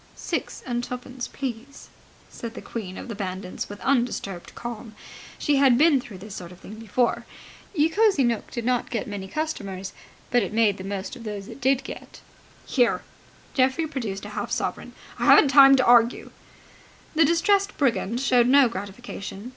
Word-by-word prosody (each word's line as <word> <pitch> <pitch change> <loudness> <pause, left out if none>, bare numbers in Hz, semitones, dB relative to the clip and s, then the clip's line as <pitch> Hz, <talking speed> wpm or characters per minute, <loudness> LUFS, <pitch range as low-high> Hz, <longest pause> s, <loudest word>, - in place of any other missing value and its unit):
"Six - - -4
and 240 -1 -2
twopence, 250 0 -6
please!" 265 +1 -7 0.4
said 230 -1 -8
the - - -6
queen 190 -5 -6
of - - -7
the 230 - -5
bandits 185 -2 -5
with 205 0 -8
undisturbed 235 -8 -1
calm. 235 -2 -7 0.4
She 290 -1 +1
had 270 -3 +5
been 295 -2 +5
through 210 -5 -11
this 200 +2 -10
sort 175 -2 -8
of 180 - -14
thing 200 - -11
before. 230 +2 0 0.5
Ye 300 -1 +4
Cosy 390 -3 +3
Nooke 235 -3 -1
did 235 -2 -5
not 250 -1 0
get 230 -4 -2
many 200 -2 -6
customers; 195 -8 -4 0.4
but 245 - +4
it 200 0 -3
made 215 -3 +3
the - - -6
most 195 0 -5
of 235 - -11
those 205 -2 -6
it - - -11
did 265 +1 +2
get. - - -9 0.5
"Here!" 245 -3 +1 0.5
Geoffrey 265 +4 +2
produced 225 -10 -5
a - - -7
half - - -4
sovereign. - - -3 0.3
"I - - 0
haven't 285 - +7
time 275 0 +8
to 260 - +2
argue!" 240 0 +4 0.8
The 320 +1 +5
distressed 390 +6 +2
brigand 240 -4 0
showed 250 -3 +4
no 275 0 +6
gratification. 200 +1 -7
240 Hz, 175 wpm, -25 LUFS, 205-270 Hz, 0.8 s, time